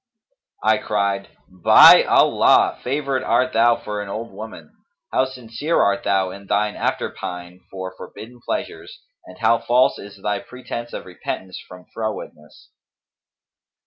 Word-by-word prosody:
I 110 0 +3
cried, 100 -1 -2 0.2
'By 90 -2 +7
Allah, - - +3
favoured 135 0 -1
art 130 0 +1
thou 115 +1 +4
for 105 -2 -5
an 100 - -7
old 115 +2 -6
woman! 100 -6 -11 0.4
How 130 - +3
sincere 130 +5 -3
art 100 0 +2
thou 95 -2 +1
in 100 +1 -12
thine 105 +1 0
after - - -2
pine 90 0 -8
for 95 -1 -7
forbidden 120 +5 -11
pleasures - - -6 0.2
and 90 - -13
how 115 0 +2
false 120 +2 +2
is 100 0 -12
thy 105 -1 -1
pretence 120 -2 -8
of - - -6
repentance 95 -1 -7
from 90 0 -13
frowardness!'" 110 -8 -7
105 Hz, 140 wpm, -21 LUFS, 95-120 Hz, 0.4 s, By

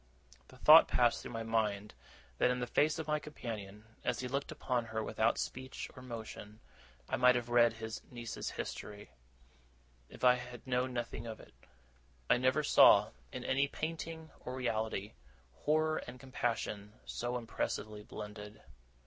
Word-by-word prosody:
The 130 - -16
thought 155 +5 +9
passed 120 -1 +3
through - - -8
my 115 0 -3
mind 105 -2 0 0.5
that - - +4
in 125 0 0
the 125 - -1
face 150 +5 +2
of 160 - -3
my 150 0 +1
companion, 110 -8 -7 0.2
as - - 0
he 125 - -3
looked 140 +2 -2
upon 125 -2 -1
her 110 0 -3
without 110 +2 +1
speech 130 +1 -5
or 130 - -10
motion, 110 -3 -8 0.5
I - - -1
might 125 +1 +6
have 120 -1 -2
read 120 -1 +5
his 110 -1 -6
niece's 120 -2 -5
history, 105 0 -6 1.0
if - - -13
I 125 -1 +8
had 125 -1 -9
known 130 0 0
nothing 120 -1 -4
of 110 -1 -6
it. - - -15 0.8
I - - +6
never 130 +4 +2
saw, - - +7 0.2
in - - -6
any 140 +2 +2
painting 160 +1 -5
or 125 - -6
reality, 110 -5 -2 0.4
horror 155 +1 +1
and 125 +1 -9
compassion 115 -5 -3
so 120 +1 -3
impressively 110 -2 -3
blended. 105 0 -8
120 Hz, 155 wpm, -34 LUFS, 110-130 Hz, 1.0 s, thought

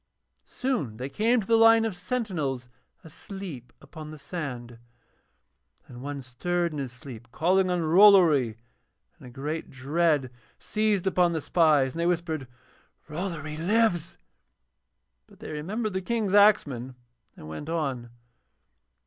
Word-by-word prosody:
Soon 235 - -3
they 130 +3 -5
came 230 - +2
to - - -8
the 230 - +3
line 225 0 +6
of 215 -5 -3
sentinels 175 - -3 0.3
asleep 165 - -9
upon 155 +2 -11
the 155 - -9
sand, 135 -6 -6 1.1
and 120 -1 -11
one 140 0 -6
stirred 170 +8 -2
in 150 - -5
his 135 -3 -4
sleep 120 -2 -11
calling 185 +6 +2
on 180 -1 0
Rollory, 165 - +5 0.6
and - - -12
a - - -10
great 150 +6 -5
dread 145 0 0 0.3
seized 215 -3 0
upon 180 -2 +2
the 160 - -1
spies 150 -6 +3
and 165 - -8
they 170 - +1
whispered 160 -5 -2 0.6
'Rollory 155 -2 -5
lives,' 175 -1 +1 1.1
but - - -19
they - - -9
remembered 200 +8 -3
the 190 - -2
King's 215 -1 -1
axeman 140 - +3 0.4
and 75 - -11
went 80 - -7
on. 135 -8 -2
160 Hz, 135 wpm, -26 LUFS, 135-190 Hz, 1.1 s, line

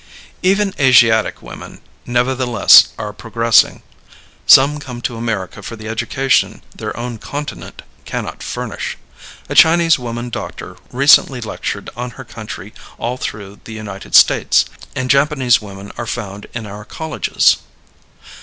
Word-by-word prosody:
Even 195 +1 +1
Asiatic 120 -5 +4
women, - - -11 0.3
nevertheless, 120 -2 +5
are 105 -2 -5
progressing. 115 +1 +2 0.6
Some 145 +3 +6
come 125 -4 -8
to 120 - -3
America 115 -5 -4
for 115 - -7
the 110 -1 -10
education 130 +4 0
their - - -6
own 120 -1 -5
continent 145 +5 -7 0.2
cannot - - -6
furnish. - - -5 0.5
A - - -4
Chinese 165 -1 +5
woman 120 0 -5
doctor - - -7 0.2
recently 140 -1 +4
lectured 115 - -5
on 125 +2 -5
her 130 - -8
country 105 -3 -9 0.2
all 120 +2 -3
through 100 -4 -7
the 115 - -9
United 100 -3 -6
States; - - +5 0.3
and 130 - -2
Japanese 140 -3 +3
women 100 -1 -10
are 120 - -4
found 105 -4 -6
in 115 -2 -5
our 105 +1 -9
colleges. 160 +7 +1
120 Hz, 130 wpm, -17 LUFS, 110-135 Hz, 0.6 s, Some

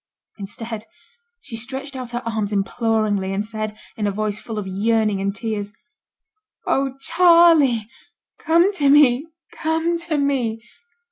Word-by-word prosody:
Instead 220 +2 -6 0.6
she 240 - -9
stretched 265 +4 -5
out 255 -2 -6
her 240 0 -4
arms 220 -3 -2
imploringly, 205 -1 0
and 200 +2 -2
said, 215 -1 -5 0.2
in 210 -2 -1
a - - 0
voice 210 +1 -2
full 225 -2 -7
of 210 - -3
yearning 210 +1 0
and 200 +1 -2
tears, 210 -1 -4 0.9
'Oh! 270 0 0
Charley! 330 -9 +5 0.5
come 340 +5 +3
to 290 -8 +2
me 285 0 +5 0.3
come 325 +1 0
to 335 -3 -2
me!' 250 -6 -1
230 Hz, 135 wpm, -21 LUFS, 210-285 Hz, 0.9 s, Charley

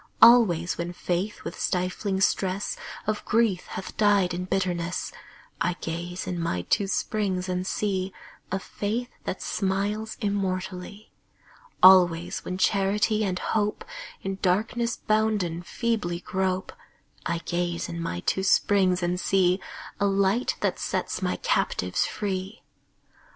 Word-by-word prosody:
Always 200 -9 +6
when 170 +1 -3
Faith 180 +4 -2
with - - -6
stifling 190 +2 -1
stress 195 0 +1 0.3
Of 215 0 -1
grief 220 -5 +1
hath 190 - -7
died 200 -4 +4
in 180 +1 -3
bitterness, 180 -2 -1 0.5
I 175 +1 +2
gaze 175 +2 -4
in 180 -1 -3
my 90 - -1
two 195 - +1
springs 190 -2 -1
and 180 0 -2
see 190 -2 -1 0.4
A 190 - +1
Faith 215 +5 -3
that 185 - -3
smiles 205 +3 -1
immortally. 195 -1 -3 0.7
Always 175 -2 +6
when 185 - -4
Charity 205 +3 +2
and 185 -3 -1
Hope, 210 +2 -1 0.4
In 195 0 -3
darkness 225 +5 +1
bounden, 215 -6 0
feebly 180 -2 -1
grope, 185 0 -2 0.5
I 170 0 0
gaze 175 0 -2
in 170 -1 -5
my 85 - -3
two 190 - 0
springs 185 -1 +3
and 175 +1 0
see 185 -1 +3 0.4
A 200 - +3
Light 200 +4 +2
that - - 0
sets - - -2
my - - 0
captives - - 0
free. 195 +1 -4
190 Hz, 130 wpm, -26 LUFS, 180-205 Hz, 0.7 s, Always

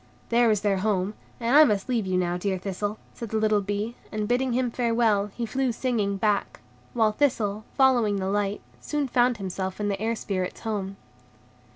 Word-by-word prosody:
"There 235 0 +4
is 210 -2 +2
their 205 -2 +1
home, 195 0 0 0.3
and 235 +3 +1
I 305 - +10
must 210 -8 +1
leave 235 -6 0
you 185 -1 +1
now, 175 -1 0
dear 190 +1 -1
Thistle," 205 +3 -3 0.2
said 230 - -7
the 220 - -1
little 215 -1 +2
bee; 205 +4 -3 0.2
and, 215 -1 -2
bidding 250 +1 +1
him 250 -1 0
farewell, 230 -4 +2
he 230 +4 -5
flew 260 +3 0
singing 225 -5 -1
back; 205 0 0 0.4
while 220 -2 +3
Thistle, 215 -5 0
following 245 -6 +4
the 190 -1 -2
light, 205 0 -1 0.2
soon 295 -2 -2
found 245 -1 +2
himself 190 -1 -4
in 205 0 0
the 195 0 -2
Air 225 +1 0
Spirits' 185 -4 -3
home. 200 -3 -3
215 Hz, 190 wpm, -26 LUFS, 200-235 Hz, 0.4 s, I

